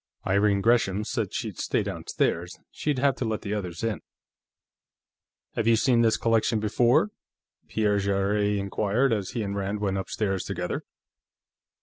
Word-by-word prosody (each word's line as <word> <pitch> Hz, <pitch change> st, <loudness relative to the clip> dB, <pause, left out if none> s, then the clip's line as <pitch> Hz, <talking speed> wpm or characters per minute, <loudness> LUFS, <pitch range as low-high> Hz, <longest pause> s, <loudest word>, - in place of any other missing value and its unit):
Irene 100 Hz, +1 st, +3 dB
Gresham 105 Hz, -3 st, +2 dB
said -, -, -2 dB
she'd -, -, -4 dB
stay -, -, 0 dB
downstairs; 85 Hz, +1 st, -2 dB
she'd 150 Hz, -3 st, -1 dB
have 135 Hz, +1 st, +2 dB
to -, -, -2 dB
let 110 Hz, -1 st, -2 dB
the 100 Hz, -, -3 dB
others 90 Hz, -4 st, -4 dB
in. 115 Hz, -3 st, -1 dB, 1.5 s
"Have 115 Hz, -, -1 dB
you 115 Hz, -, +6 dB
seen 120 Hz, +1 st, +3 dB
this 115 Hz, -1 st, +3 dB
collection 115 Hz, 0 st, +2 dB
before?" 120 Hz, -, +3 dB, 0.6 s
Pierre 105 Hz, -2 st, +1 dB
Jarrett 100 Hz, +1 st, +1 dB
inquired 105 Hz, +6 st, +1 dB
as 100 Hz, -4 st, -2 dB
he 115 Hz, -, -1 dB
and 100 Hz, -1 st, -3 dB
Rand 100 Hz, +1 st, -2 dB
went 95 Hz, -2 st, -1 dB
upstairs 95 Hz, -1 st, -2 dB
together. 90 Hz, -2 st, -4 dB
105 Hz, 145 wpm, -26 LUFS, 100-115 Hz, 1.5 s, you